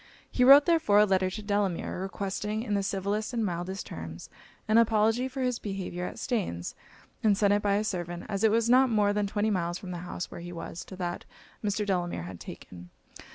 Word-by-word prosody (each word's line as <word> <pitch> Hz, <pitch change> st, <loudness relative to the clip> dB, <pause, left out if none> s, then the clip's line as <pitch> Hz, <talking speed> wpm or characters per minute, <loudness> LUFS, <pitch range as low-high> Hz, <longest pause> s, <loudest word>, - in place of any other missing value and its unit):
He 250 Hz, -, +2 dB
wrote 275 Hz, +3 st, +9 dB
therefore 320 Hz, -, +3 dB
a 210 Hz, -, +7 dB
letter 190 Hz, -2 st, +2 dB
to 215 Hz, +3 st, -6 dB
Delamere, 200 Hz, -3 st, -1 dB
requesting, 200 Hz, +3 st, -3 dB
in 210 Hz, -, -2 dB
the 200 Hz, -, +2 dB
civilest 200 Hz, +4 st, -2 dB
and 230 Hz, -2 st, 0 dB
mildest 185 Hz, +1 st, -4 dB
terms, 80 Hz, 0 st, -8 dB, 0.4 s
an 220 Hz, +1 st, +5 dB
apology 225 Hz, +2 st, +3 dB
for 265 Hz, 0 st, -4 dB
his 250 Hz, -2 st, 0 dB
behaviour 185 Hz, -3 st, -4 dB
at -, -, -8 dB
Staines; 180 Hz, -, -2 dB, 0.5 s
and 210 Hz, -3 st, +3 dB
sent 205 Hz, -1 st, +3 dB
it 205 Hz, -, +2 dB
by 200 Hz, -1 st, +2 dB
a 210 Hz, -, +1 dB
servant; 175 Hz, -4 st, -4 dB
as 200 Hz, -1 st, -2 dB
it 220 Hz, -, +6 dB
was 230 Hz, +1 st, +2 dB
not 255 Hz, +2 st, +5 dB
more 210 Hz, -2 st, +2 dB
than 205 Hz, -1 st, 0 dB
twenty 210 Hz, +2 st, 0 dB
miles 175 Hz, -2 st, -1 dB
from 185 Hz, -1 st, -8 dB
the 175 Hz, -, -5 dB
house 175 Hz, 0 st, -6 dB
where -, -, -8 dB
he 175 Hz, +1 st, -7 dB
was, 170 Hz, +1 st, -7 dB
to 190 Hz, -, -10 dB
that 175 Hz, -1 st, -4 dB, 0.4 s
Mr. 210 Hz, 0 st, 0 dB
Delamere 175 Hz, -, -1 dB
had 90 Hz, 0 st, -8 dB
taken. 90 Hz, 0 st, -10 dB
200 Hz, 210 wpm, -28 LUFS, 180-215 Hz, 0.5 s, wrote